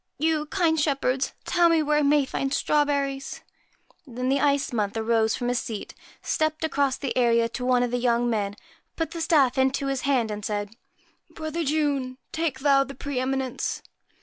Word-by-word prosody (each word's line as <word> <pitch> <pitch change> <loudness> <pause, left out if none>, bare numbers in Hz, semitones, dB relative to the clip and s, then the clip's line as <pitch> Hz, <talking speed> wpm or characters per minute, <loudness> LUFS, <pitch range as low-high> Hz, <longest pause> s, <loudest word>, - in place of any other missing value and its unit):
You, 310 0 0
kind 330 -3 +1
shepherds, 275 -3 0
tell 345 -1 +4
me 325 -2 +3
where 300 0 +2
I - - +2
may 290 -1 +3
find 270 +1 -2
strawberries.' 280 -2 0 0.7
Then 250 +1 -3
the 275 - +3
white 280 - +2
Ice 280 -1 -3
Month 210 -1 -1
arose 220 -1 +2
from 245 - -3
his 245 -1 +1
seat, 220 -3 -6 0.3
stepped 310 0 -1
across 280 -4 +1
the 275 - -3
area 235 -2 +3
to 250 - -5
one 250 -1 +3
of 245 - -1
the 245 - 0
young 240 0 +2
men, 205 -3 -1 0.4
put 325 -1 -2
the 335 -1 -5
staff 280 -6 +3
into 265 +1 +1
his 270 -1 -1
hand, 255 -6 +1
and 210 0 -5
said 205 0 -3 0.3
' - - -39
Brother 320 +1 -3
June, 285 -4 0
take 310 -5 -2
thou 275 -1 +4
the 275 0 -9
pre 280 0 -3
eminence.' 265 0 -2
270 Hz, 190 wpm, -25 LUFS, 245-295 Hz, 0.7 s, tell